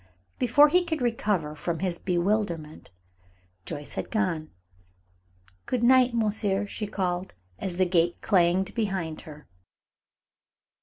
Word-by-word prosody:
Before 290 Hz, +4 st, +6 dB
he 360 Hz, +3 st, +3 dB
could 325 Hz, -2 st, -2 dB
recover 210 Hz, -, -1 dB
from 165 Hz, +2 st, -3 dB
his 180 Hz, -1 st, -2 dB
bewilderment, 175 Hz, -4 st, -1 dB, 0.8 s
Joyce 145 Hz, 0 st, -6 dB
had -, -, -4 dB
gone. 180 Hz, -8 st, -1 dB, 1.2 s
"Good 245 Hz, -2 st, -1 dB
night, 255 Hz, 0 st, +5 dB
monsieur," 210 Hz, -2 st, +1 dB
she 210 Hz, +1 st, -5 dB
called, 185 Hz, -, -3 dB, 0.2 s
as 180 Hz, -2 st, -4 dB
the 185 Hz, -, +3 dB
gate 175 Hz, -1 st, +1 dB
clanged 185 Hz, 0 st, +2 dB
behind 190 Hz, -8 st, -2 dB
her. 150 Hz, 0 st, -13 dB
190 Hz, 115 wpm, -26 LUFS, 170-220 Hz, 1.2 s, Before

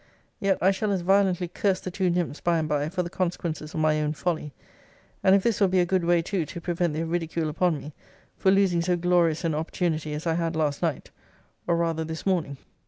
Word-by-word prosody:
Yet 195 Hz, -3 st, +2 dB
I 190 Hz, -, +6 dB
shall 200 Hz, +2 st, -1 dB
as 190 Hz, -2 st, 0 dB
violently 190 Hz, -1 st, +2 dB
curse 185 Hz, +2 st, 0 dB
the 185 Hz, -, -6 dB
two 185 Hz, 0 st, 0 dB
nymphs, 170 Hz, -4 st, -1 dB
by 170 Hz, -1 st, +2 dB
and 155 Hz, -1 st, -1 dB
by, 150 Hz, 0 st, 0 dB
for 180 Hz, +1 st, -1 dB
the 170 Hz, -, -5 dB
consequences 170 Hz, -4 st, -3 dB
of 160 Hz, -, -1 dB
my 155 Hz, -1 st, +2 dB
own 150 Hz, 0 st, 0 dB
folly: 155 Hz, -3 st, -2 dB, 0.7 s
and 190 Hz, -, +6 dB
if 195 Hz, -, +2 dB
this 230 Hz, -3 st, 0 dB
will 200 Hz, -, +6 dB
be 185 Hz, 0 st, +2 dB
a 175 Hz, -, +4 dB
good 185 Hz, 0 st, +1 dB
way 170 Hz, 0 st, +3 dB
too 190 Hz, 0 st, -1 dB
to 155 Hz, +3 st, -7 dB
prevent 175 Hz, -1 st, -1 dB
their 160 Hz, +2 st, -2 dB
ridicule 165 Hz, -1 st, -2 dB
upon 170 Hz, +1 st, +1 dB
me, 145 Hz, +1 st, -9 dB, 0.4 s
for 190 Hz, -, +2 dB
losing 190 Hz, -3 st, +3 dB
so 175 Hz, +1 st, +1 dB
glorious 170 Hz, -2 st, +2 dB
an 165 Hz, -2 st, 0 dB
opportunity 155 Hz, -1 st, -2 dB
as 150 Hz, -, -6 dB
I 165 Hz, -, +1 dB
had 165 Hz, 0 st, -1 dB
last 150 Hz, -3 st, 0 dB
night, 165 Hz, -6 st, -2 dB, 0.6 s
or 170 Hz, -, +3 dB
rather 165 Hz, -1 st, 0 dB
this 160 Hz, 0 st, -6 dB
morning. 170 Hz, -8 st, 0 dB
170 Hz, 230 wpm, -26 LUFS, 160-185 Hz, 0.7 s, I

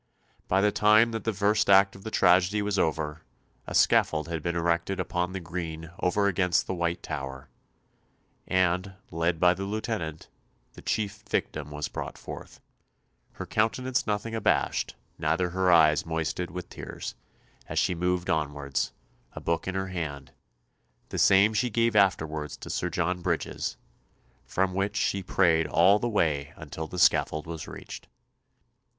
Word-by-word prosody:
By 95 Hz, -, +3 dB
the 105 Hz, +1 st, +3 dB
time 110 Hz, +3 st, +5 dB
that 115 Hz, 0 st, -5 dB
the 115 Hz, -, +2 dB
first 105 Hz, +1 st, +1 dB
act 95 Hz, 0 st, +6 dB
of 95 Hz, -, -13 dB
the 110 Hz, -, -4 dB
tragedy 95 Hz, +1 st, +3 dB
was 100 Hz, -2 st, 0 dB
over, 80 Hz, -1 st, -1 dB, 0.5 s
a -, -, -4 dB
scaffold 80 Hz, +1 st, +3 dB
had 80 Hz, -2 st, -3 dB
been 85 Hz, +2 st, -2 dB
erected 85 Hz, +2 st, 0 dB
upon 90 Hz, 0 st, -1 dB
the 95 Hz, -, -4 dB
green 85 Hz, -2 st, -6 dB
over 100 Hz, +3 st, +1 dB
against 95 Hz, -3 st, +2 dB
the -, -, -3 dB
White 85 Hz, -1 st, -2 dB
Tower, 65 Hz, -2 st, -6 dB, 1.0 s
and 95 Hz, +1 st, +1 dB, 0.2 s
led 85 Hz, +1 st, 0 dB
by 90 Hz, 0 st, +5 dB
the 95 Hz, +2 st, -5 dB
Lieutenant, 105 Hz, -7 st, -4 dB, 0.5 s
the -, -, -12 dB
chief 110 Hz, 0 st, -2 dB
victim 75 Hz, -1 st, -2 dB
was 75 Hz, 0 st, -4 dB
brought -, -, -6 dB
forth, -, -, -9 dB, 0.7 s
"her -, -, -6 dB
countenance 125 Hz, +4 st, 0 dB
nothing 105 Hz, +2 st, -2 dB
abashed, 110 Hz, -2 st, 0 dB, 0.2 s
neither 80 Hz, +3 st, 0 dB
her 95 Hz, 0 st, +2 dB
eyes 75 Hz, -3 st, +5 dB
moisted 80 Hz, +2 st, -2 dB
with 90 Hz, 0 st, -7 dB
tears," -, -, -7 dB, 0.5 s
as -, -, -5 dB
she -, -, +2 dB
moved 90 Hz, +1 st, -1 dB
onwards, 70 Hz, -3 st, -1 dB, 0.4 s
a -, -, -7 dB
book 85 Hz, +2 st, -1 dB
in 95 Hz, -, -2 dB
her 95 Hz, 0 st, -2 dB
hand 75 Hz, -7 st, -5 dB, 0.8 s
the -, -, -3 dB
same 100 Hz, +3 st, +5 dB
she 125 Hz, +3 st, +1 dB
gave 115 Hz, 0 st, +1 dB
afterwards 80 Hz, -7 st, +1 dB
to -, -, -7 dB
Sir -, -, -1 dB
John 90 Hz, 0 st, -1 dB
Bridges -, -, -2 dB, 0.7 s
from 95 Hz, 0 st, 0 dB
which 100 Hz, +2 st, -1 dB
she 100 Hz, -, 0 dB
prayed 85 Hz, -4 st, +2 dB
all 95 Hz, +7 st, +5 dB
the 120 Hz, -, -1 dB
way 75 Hz, -8 st, 0 dB
until 80 Hz, 0 st, -7 dB
the 90 Hz, -, -8 dB
scaffold 75 Hz, -3 st, +3 dB
was 80 Hz, -1 st, -6 dB
reached. -, -, -9 dB
90 Hz, 155 wpm, -27 LUFS, 80-100 Hz, 1.0 s, act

